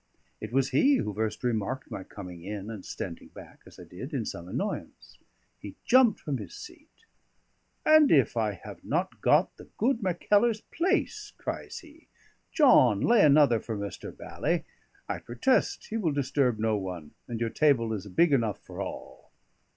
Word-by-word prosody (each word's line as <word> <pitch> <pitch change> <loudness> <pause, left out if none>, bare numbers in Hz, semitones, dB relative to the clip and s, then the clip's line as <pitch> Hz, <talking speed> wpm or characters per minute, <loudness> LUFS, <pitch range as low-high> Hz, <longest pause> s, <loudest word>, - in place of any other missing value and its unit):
It - - -7
was 135 +1 +1
he 280 +1 +4
who 105 - -2
first 110 +2 -3
remarked 120 +2 -2
my 95 - -5
coming 90 -4 -10
in 105 +2 -6
and 105 -4 -8
standing 85 -3 -7
back - - -14
(as - - -15
I - - -9
did) 130 - -8
in 120 -5 -2
some 85 +1 -6
annoyance. - - -5 0.4
He 100 - -9
jumped 250 -4 +5
from 145 -3 -3
his 105 - -9
seat. 345 +5 -14 0.8
"And 310 -2 +6
if 135 -7 +4
I 110 -3 0
have 95 - -11
not - - -2
got - - +3
the - - -12
good 235 +1 +1
Mackellar's 210 +4 +2
place!" 405 +4 -1
cries - - -5
he. 320 -1 -18 0.4
"John, 130 - +5
lay 235 -2 +4
another 145 -5 +5
for 110 0 -5
Mr. 100 0 -6
Bally; - - -2 0.4
I - - -3
protest 125 - 0
he 225 - -1
will 170 -9 0
disturb 135 -3 +1
no 110 0 +1
one, 90 -6 -6 0.2
and 115 -2 -5
your 115 -1 -1
table 125 -7 +2
is 105 -2 -5
big 145 - +3
enough 115 -6 +1
for - - -7
all." - - -8
125 Hz, 170 wpm, -28 LUFS, -, 0.8 s, And